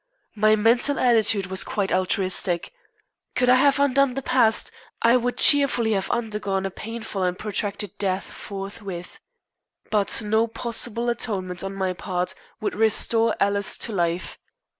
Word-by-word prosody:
My 215 0 +3
mental 235 +6 +3
attitude 220 -5 +2
was 190 0 -1
quite 200 -2 -2
altruistic. 185 - 0 0.6
Could 250 0 +2
I 250 - +7
have 280 +1 +3
undone 275 -2 +2
the 275 - -4
past, 230 -5 +2 0.3
I 230 +1 +5
would 245 0 -1
cheerfully 275 -6 +5
have 195 -3 -1
undergone 210 -4 -2
a 195 - -3
painful 225 -1 -6
and 180 0 -1
protracted 205 -1 -4
death 190 -1 -1
forthwith. 195 -2 -8 0.7
But 210 +1 +2
no 220 +2 +1
possible 235 0 -1
atonement 190 -7 -3
on 195 0 -5
my 190 -1 -2
part 180 0 -3 0.3
would 405 - -3
restore 225 - +2
Alice 200 0 +1
to - - -2
life. 175 -2 -2
215 Hz, 140 wpm, -23 LUFS, 195-235 Hz, 0.7 s, I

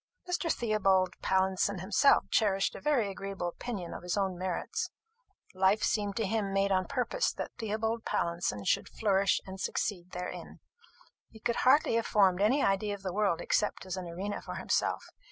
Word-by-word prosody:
Mr. 350 -2 0
Theobald 195 -5 +2
Pallinson 190 +1 +1
himself 195 +10 +4
cherished 195 -3 +2
a - - -9
very 260 -9 +1
agreeable 195 -2 -4
opinion 195 -3 -6
of - - -7
his 180 +2 -2
own 190 -2 0
merits. 185 - -3 0.6
Life 190 +3 +3
seemed 205 -2 0
to 225 -2 0
him 205 -1 -1
made 195 0 +1
on 185 -1 +1
purpose 280 - 0
that - - -5
Theobald 220 +1 -2
Pallinson 170 - -1
should - - +1
flourish 195 -2 +2
and 190 0 -8
succeed 180 -4 -2
therein. 180 0 -7 0.7
He 220 - -14
could 235 +2 -1
hardly 270 +1 +4
have 230 - -1
formed 195 -3 +3
any 255 +8 +3
idea 205 +1 +1
of 200 - -14
the 185 -2 -3
world 195 -4 +1
except 210 -2 0
as 185 -1 -4
an 185 -2 -5
arena 190 +5 -4
for - - -7
himself. - - 0
195 Hz, 170 wpm, -30 LUFS, 185-220 Hz, 0.7 s, himself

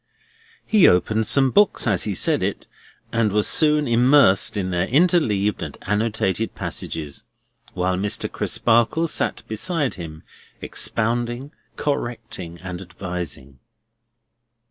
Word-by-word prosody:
He 215 -4 +5
opened 110 +5 +2
some 135 -2 +3
books 205 +5 +3
as 100 -7 +1
he 105 -3 -2
said - - +1
it, - - -3 0.5
and 115 -2 +1
was 105 +1 +2
soon 150 -2 +3
immersed 120 -4 +4
in 95 -2 -2
their 90 +1 0
interleaved 125 - +2
and - - -6
annotated 105 0 -1
passages; 75 -3 -5 0.5
while 90 0 -1
Mr. 100 +2 -1
Crisparkle 120 +8 +1
sat - - -1
beside 145 - -1
him, 80 -3 -9 0.4
expounding, 120 +4 -2 0.2
correcting, 115 - -4
and 90 -1 -6
advising. 90 -7 -7
110 Hz, 115 wpm, -22 LUFS, 95-130 Hz, 0.5 s, He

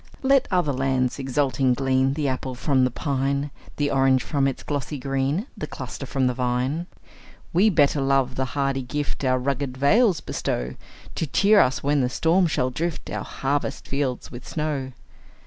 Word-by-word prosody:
Let 275 0 +4
other 175 -6 +1
lands, 130 0 0
exulting, 135 -1 +1
glean 135 0 +2
The 150 -2 -1
apple 130 -1 -3
from 130 0 +2
the - - +1
pine, 140 +2 -1 0.2
The 145 -1 0
orange 135 -1 +3
from 140 -2 +1
its 135 - -3
glossy 145 0 -3
green, 135 - -1
The - - -5
cluster - - -7
from 135 -2 0
the 125 - +2
vine; 130 +6 -1 0.7
We 195 +6 +5
better 145 -5 +3
love 135 -1 +2
the 130 0 -1
hardy 135 -1 +1
gift 145 +3 -4
Our 130 -1 +3
rugged 130 0 -2
vales 185 - +4
bestow, 60 - -3 0.4
To 160 - -2
cheer 205 +8 +4
us 130 -4 +2
when 145 0 +2
the 125 - +1
storm 170 +7 +2
shall 130 -5 0
drift 165 +4 -3
Our - - -3
harvest 140 0 -2
fields 135 -3 -2
with 120 0 -9
snow. 150 -4 -2
135 Hz, 170 wpm, -24 LUFS, 130-150 Hz, 0.7 s, We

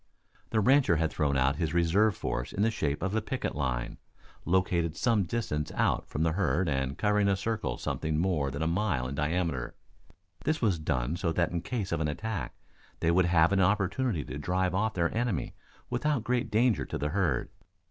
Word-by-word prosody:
The 110 - +1
rancher 130 -5 +4
had 80 0 0
thrown 70 -2 +1
out 65 +2 +2
his 80 +1 -1
reserve 95 +5 +3
force - - -3
in 100 - 0
the 115 - +3
shape 75 -7 -2
of 95 +1 -1
a 110 - +1
picket - - -3
line, 65 -4 -2 0.5
located 85 -3 +1
some 110 -6 +2
distance 80 -8 -2
out - - +1
from 75 - -1
the 80 - +2
herd 90 0 +1
and 65 -2 -1
covering 105 -1 +2
a 100 - +3
circle 100 - -2
something 80 -1 -2
more 80 -5 +1
than 70 +4 -3
a - - +1
mile 85 -7 0
in 65 - -5
diameter. 75 -3 -1 0.7
This 155 +1 0
was 100 -8 +1
done 70 0 -1
so 85 -2 0
that 85 -1 +1
in 85 -1 -2
case 105 -3 -3
of 85 - 0
an 75 - +1
attack 95 - -4 0.4
they 85 - +2
would 90 +1 +4
have 85 0 +4
an 95 -1 +3
opportunity 100 - +1
to 65 +3 -6
drive 90 +4 0
off 110 +3 0
their 85 +1 0
enemy 115 - -1 0.4
without 125 +1 0
great 120 -1 0
danger 115 +2 +2
to - - -4
the 75 - -1
herd. 85 -7 0
90 Hz, 200 wpm, -29 LUFS, 75-105 Hz, 0.7 s, rancher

